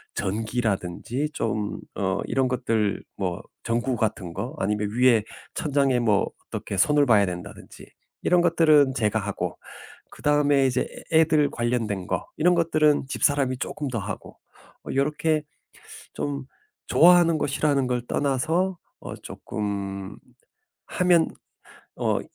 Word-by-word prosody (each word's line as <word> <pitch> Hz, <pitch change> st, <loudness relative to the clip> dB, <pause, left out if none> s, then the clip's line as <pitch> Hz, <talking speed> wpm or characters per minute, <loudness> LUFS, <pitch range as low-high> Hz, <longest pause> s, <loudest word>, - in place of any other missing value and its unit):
전기라든지 110 Hz, +4 st, -2 dB
좀 105 Hz, -2 st, -2 dB, 0.2 s
어 95 Hz, -1 st, -1 dB
이런 135 Hz, -1 st, +1 dB
것들 115 Hz, -4 st, 0 dB
뭐 90 Hz, -3 st, -2 dB, 0.2 s
전구 120 Hz, +2 st, 0 dB
같은 100 Hz, -6 st, -2 dB
거 105 Hz, +8 st, -5 dB
아니면 105 Hz, +1 st, -1 dB
위에 120 Hz, -2 st, +4 dB, 0.3 s
천장에 140 Hz, -4 st, +1 dB
뭐 105 Hz, -4 st, +2 dB, 0.2 s
어떻게 100 Hz, -, -5 dB
손을 145 Hz, +6 st, +4 dB
봐야 105 Hz, -5 st, +5 dB
된다든지 90 Hz, -1 st, -8 dB, 0.4 s
이런 180 Hz, -1 st, +4 dB
것들은 155 Hz, -5 st, +4 dB
제가 110 Hz, -2 st, +1 dB
하고, 100 Hz, -1 st, -4 dB, 0.5 s
그다음에 145 Hz, -2 st, +2 dB
이제 125 Hz, 0 st, 0 dB, 0.3 s
애 160 Hz, -, +7 dB
애들 155 Hz, -2 st, +3 dB
관련된 115 Hz, -6 st, -2 dB
거 -, -, -2 dB
이런 180 Hz, +3 st, +4 dB
것들은 155 Hz, -4 st, +2 dB
집사람이 135 Hz, -2 st, +1 dB
쪼끔 145 Hz, +2 st, -4 dB
더 120 Hz, -, -3 dB
하고 100 Hz, -1 st, -7 dB, 0.5 s
뭐 -, -, -5 dB
요렇게 150 Hz, +2 st, +1 dB, 0.7 s
좀 140 Hz, -2 st, -4 dB, 0.4 s
좋아하는 175 Hz, -1 st, +6 dB
거 -, -, 0 dB
싫어하는 140 Hz, -2 st, +1 dB
걸 125 Hz, -1 st, 0 dB
떠나서 160 Hz, +7 st, 0 dB, 0.2 s
어 -, -, -7 dB
쪼끔 100 Hz, -2 st, -5 dB, 0.7 s
하면 180 Hz, -2 st, +3 dB, 0.7 s
어 -, -, +1 dB
125 Hz, 260 characters per minute, -25 LUFS, 105-150 Hz, 0.7 s, 애